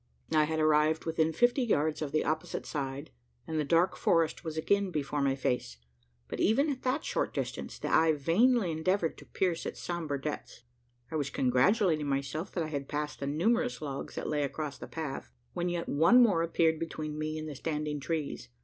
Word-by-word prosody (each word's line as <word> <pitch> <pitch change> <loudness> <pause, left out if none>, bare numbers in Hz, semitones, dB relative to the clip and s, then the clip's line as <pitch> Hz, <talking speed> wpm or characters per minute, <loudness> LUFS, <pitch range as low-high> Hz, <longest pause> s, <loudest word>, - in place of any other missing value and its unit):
I 155 -1 +5
had 160 +1 -2
arrived 155 +1 +3
within 160 -1 +1
fifty 240 - +3
yards 155 - +1
of 150 -3 -2
the 155 - +1
opposite 155 +1 -2
side, 140 -1 -4 0.3
and 160 -1 -2
the - - +2
dark 170 +5 +3
forest 165 -1 +1
was 160 -2 -5
again 200 +4 +2
before 150 -3 -2
my 135 -1 +2
face; 125 - -2 0.5
but - - -5
even 275 +8 +3
at 260 - -5
that 260 +4 -1
short - - -1
distance, - - -4
the - - -4
eye 160 0 +5
vainly 185 - +3
endeavoured 165 +2 0
to - - -14
pierce 175 -3 -1
its - - -5
sombre 160 -5 -3
depths. 140 -4 -6 0.5
I 160 - -1
was 140 -2 -1
congratulating 155 - +2
myself, 140 +4 -2
that 170 - -1
I 155 - -4
had 140 -2 -4
passed 150 0 -3
the 140 - -3
numerous 230 - +1
logs 140 -3 -5
that - - -4
lay 150 -1 0
across 145 -1 -3
the - - -7
path, 145 - -5 0.2
when 175 +1 -1
yet 175 -1 -2
one 165 +12 +5
more 200 -8 +3
appeared 165 -1 +2
between 155 -2 -4
me 155 0 -2
and 155 0 -5
the 150 - -5
standing 150 +1 -3
trees. 150 - -3
155 Hz, 195 wpm, -30 LUFS, 145-170 Hz, 0.5 s, I